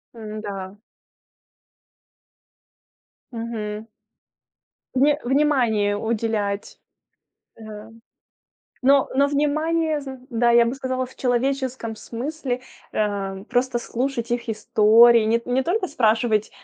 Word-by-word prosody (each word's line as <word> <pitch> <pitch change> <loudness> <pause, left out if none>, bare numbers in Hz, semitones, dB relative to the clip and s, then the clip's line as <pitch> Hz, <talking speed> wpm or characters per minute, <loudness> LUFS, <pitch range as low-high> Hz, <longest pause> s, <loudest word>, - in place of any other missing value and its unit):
М-да. 205 -3 -7 2.5
Мгм. 220 -2 -5 1.1
Вни 290 +3 +4
внимание 240 -7 +2
уделять. 215 -2 -2 0.8
А. 215 0 -10 0.9
Но 275 +1 +4
но 280 +1 +4
внимание 310 +2 0
зн 270 -1 -8
да, 235 +1 +2
я 235 0 +5
бы 240 - -2
сказала, 260 -1 -3
в 260 - -17
человеческом 260 -2 -1
смысле, 255 +2 -4 0.3
а, 200 -2 -2
просто 245 +1 0
слушать 235 0 -3
их 240 -1 -3
истории. 225 +1 +5
Нет 230 +2 0
не 255 +2 +1
только 370 +5 0
спрашивать: 220 -5 +1
235 Hz, 95 wpm, -23 LUFS, 215-265 Hz, 2.5 s, я